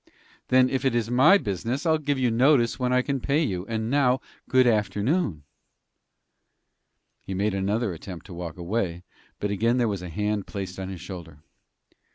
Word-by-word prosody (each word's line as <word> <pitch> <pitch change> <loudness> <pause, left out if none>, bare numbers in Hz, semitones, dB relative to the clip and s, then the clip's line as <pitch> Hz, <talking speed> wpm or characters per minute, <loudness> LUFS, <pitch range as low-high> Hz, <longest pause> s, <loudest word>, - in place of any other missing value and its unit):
"Then, 130 0 +5
if 130 0 -2
it 130 -3 +1
is 115 -1 0
my 135 +11 +6
business, 115 - -3
I'll 160 -1 +3
give 145 -2 -1
you 125 -2 +1
notice 125 0 +3
when 125 -1 0
I 125 0 +3
can 140 0 -1
pay 145 +5 +1
you. 95 - -3
And 110 -1 -2
now, 135 -2 +3 0.3
good 130 -1 +5
afternoon." 105 - +1 1.8
He 95 - -6
made 100 +2 0
another 100 +2 0
attempt 85 0 -9
to 95 - -10
walk 85 -2 -6
away, 90 -1 -2 0.4
but 105 - -2
again 115 +5 +1
there 120 -2 +2
was 100 -4 -2
a 90 - -6
hand 105 +3 -2
placed 95 -2 -6
upon 95 0 -4
his 95 -2 -7
shoulder. 80 -6 -9
110 Hz, 180 wpm, -25 LUFS, 95-130 Hz, 1.8 s, my